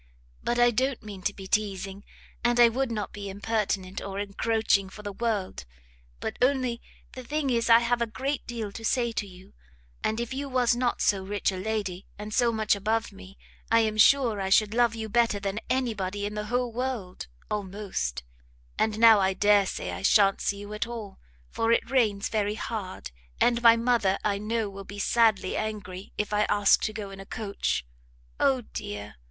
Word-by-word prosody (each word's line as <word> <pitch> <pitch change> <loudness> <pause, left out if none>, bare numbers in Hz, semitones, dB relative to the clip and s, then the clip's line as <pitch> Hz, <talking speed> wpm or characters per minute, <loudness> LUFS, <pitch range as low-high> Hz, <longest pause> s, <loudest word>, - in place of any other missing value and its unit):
But 240 - 0
I 240 0 +5
don't 260 +2 -1
mean 205 -3 -8
to 200 - -1
be 195 - -9
teasing, 195 -1 -2 0.4
and 240 0 +2
I 240 -1 +8
would 255 +1 -1
not 210 -3 -3
be 200 -1 -6
impertinent 200 -2 -2
or 195 0 -6
encroaching 205 -1 +1
for 210 +2 -11
the 205 - -4
world; 210 -3 -2 0.6
but - - -4
only 255 -2 +1 0.3
the 255 - -8
thing 290 +1 -1
is 230 -1 +1
I 230 0 +8
have 235 0 0
a 235 - +1
great 270 +5 -3
deal 225 -4 -4
to 225 - -9
say 235 +1 +1
to 210 -2 -3
you, 185 0 -15 0.5
and 220 +1 0
if 235 +2 -3
you 280 +1 -4
was 250 -2 +2
not 245 0 0
so 195 -2 +2
rich 200 +1 -1
a - - -5
lady, 195 -2 -3
and 210 +1 -7
so 240 +1 +3
much 215 -2 +1
above 220 +3 -1
me, 195 0 -13 0.3
I 230 0 +5
am 215 -1 0
sure 225 -2 +4
I 190 - -2
should 210 +2 +4
love 235 -1 +3
you 220 -1 -4
better 230 -1 +2
than 200 +1 -3
any 255 -2 +1
body 200 0 -3
in 205 - -4
the 210 0 -4
whole 245 +1 -1
world, 240 - -4 0.2
almost; 195 - -3 0.6
and 220 -1 +1
now 225 -2 +7
I 190 0 +1
dare 205 -1 +4
say - - -4
I - - -6
shan't 195 -2 +4
see 200 - -1
you 205 +1 -8
at 210 +2 -2
all; 220 -5 -7 0.3
for 225 0 0
it 230 - +1
rains 215 -6 +2
very 210 -1 -1
hard, 210 - -5 0.3
and 240 -1 +3
my 230 -1 +8
mother, 230 -5 +2
I 200 -1 0
know, 220 +1 -1
will 195 0 -8
be 200 +1 -10
sadly 215 -3 +2
angry 205 -3 -5
if 210 0 -2
I 210 0 +3
ask 205 -1 +4
to - - -1
go 210 -2 -6
in 195 - -10
a 195 - -9
coach. 200 - -2 0.5
O 265 -2 +3
dear! 105 - -7
215 Hz, 200 wpm, -27 LUFS, 200-235 Hz, 0.6 s, I